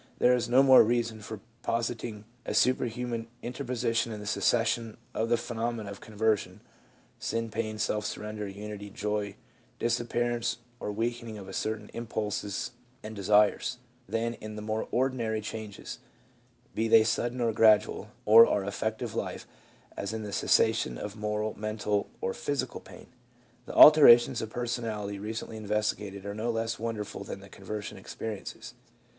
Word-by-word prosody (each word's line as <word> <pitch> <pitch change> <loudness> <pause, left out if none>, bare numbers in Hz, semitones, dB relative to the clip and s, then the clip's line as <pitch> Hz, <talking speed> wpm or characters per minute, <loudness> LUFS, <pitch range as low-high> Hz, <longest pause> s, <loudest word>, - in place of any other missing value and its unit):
There 125 - +5
is 120 -1 0
no 130 +3 +6
more 130 -1 +9
reason 115 -1 0
for 105 0 -7 0.2
positing 115 -2 -2 0.2
a - - -3
superhuman 120 -1 +1 0.2
inter 125 +3 -5
position 115 -2 0
in 105 - -5
the 105 - -8
succession 115 +1 +1 0.2
of 115 +1 -1
the 120 - +4
phenomena 115 -2 -3
of 100 - -10
conversion 110 -2 -1 0.6
(sin 115 -1 -2
pain, 110 0 -3
self 105 0 0
surrender, 105 -1 -5
unity, 105 +1 -7
joy, 105 0 -2 0.4
disappearance 120 0 0 0.2
or - - -3
weak 115 +3 -1
ening 115 -2 -7
of 95 -1 -8
certain 110 -1 -3
impulses 105 -3 -3 0.3
and 110 0 -7
desires) 105 +5 +3 0.3
than 115 +2 -1
in 110 0 -7
the 105 - -6
more 110 +1 -2
ordi 130 +2 +1
nary 110 -3 -1
changes 110 -1 -7 0.4
— 120 0 -35
be 110 +1 0
they 110 0 +7
sudden 120 +2 -1
or 115 -2 +1
gradual 105 -1 +4
— 125 - -35
of 115 +2 +9
our 100 - +1
affective 110 +2 -3
life, - - -4 0.5
as 100 +2 -4
in 110 -1 -4
the 105 -1 -6
cessation 60 - +2
of 105 +9 -6
"moral," 105 0 -2
"mental," 105 -1 -1
or 95 - -1
"physical" 145 -1 -3
pain. - - -13 0.6
The - - -7
alterations 140 -6 +9
of 110 - -4
personality, 110 -4 -3
recently 110 +1 -5
investigated, 105 -2 -2
are 100 - -4
no 110 +3 -2
less 115 0 -1
wonderful 110 -2 -4
than - - -7
the - - -13
conversion 105 -1 -6
experiences. 105 +1 -7
110 Hz, 155 wpm, -29 LUFS, 105-115 Hz, 0.6 s, more